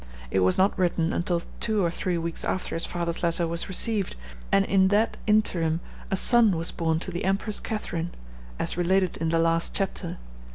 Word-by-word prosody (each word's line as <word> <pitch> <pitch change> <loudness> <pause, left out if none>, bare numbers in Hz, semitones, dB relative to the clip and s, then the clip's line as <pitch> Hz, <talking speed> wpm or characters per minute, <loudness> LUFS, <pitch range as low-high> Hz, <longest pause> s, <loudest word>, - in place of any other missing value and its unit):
It 95 - +2
was 95 0 +3
not 190 +2 +3
written 170 -2 +1
until 175 0 0 0.2
two 215 -5 +1
or 170 - +1
three 180 0 -1
weeks 165 0 -3
after 185 - -2
his 165 - -2
father's 170 -1 -3
letter 170 0 +1
was 170 +1 -3
received, 205 +1 +1 0.4
and 195 - +4
in 190 -1 +4
that 210 +3 +2
interim 170 -7 +2 0.3
a 195 - 0
son 225 -4 +4
was 165 +1 -1
born 160 -2 0
to 185 - -5
the 175 - -4
Empress 195 +2 0
Catharine, 175 -6 -3 0.5
as - - -1
related 185 +1 +1
in 165 0 -1
the 165 - +2
last 165 0 +2
chapter. 195 -1 -2
175 Hz, 190 wpm, -26 LUFS, 165-195 Hz, 0.5 s, and